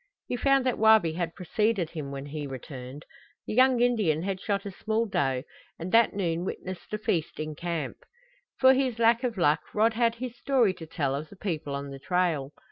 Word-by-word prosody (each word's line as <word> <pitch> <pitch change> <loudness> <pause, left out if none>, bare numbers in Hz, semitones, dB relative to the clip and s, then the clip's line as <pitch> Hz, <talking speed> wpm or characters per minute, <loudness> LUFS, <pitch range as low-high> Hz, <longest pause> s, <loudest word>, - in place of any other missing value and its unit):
He - - -3
found 275 +1 +3
that 255 - 0
Wabi 220 -7 +5
had 170 0 -3
preceded 195 -1 0
him 155 -4 -5
when 140 0 -6
he 145 0 -5
returned. 130 +1 -8 0.4
The - - -4
young 255 +1 +5
Indian 210 -11 +2
had 195 -1 -3
shot 200 -2 -1
a 200 - -4
small 220 +4 -1
doe, 135 - 0 0.3
and 175 +3 -5
that 230 -2 +5
noon 170 -3 -1
witnessed 185 -1 -6
a 215 - -1
feast 170 -6 -2
in 155 0 -3
camp. 165 -3 -4 0.6
For 260 0 +7
his 260 -3 0
lack 230 +1 +4
of 240 -4 -1
luck 155 -3 +3 0.2
Rod 220 +2 +3
had 230 0 +2
his 245 0 -6
story 245 -6 +2
to 165 -3 -10
tell 145 -4 -1
of 150 +3 -4
the - - -13
people 160 -8 -3
on 140 0 -5
the 135 - -8
trail. 165 -4 0
185 Hz, 205 wpm, -28 LUFS, 155-225 Hz, 0.6 s, For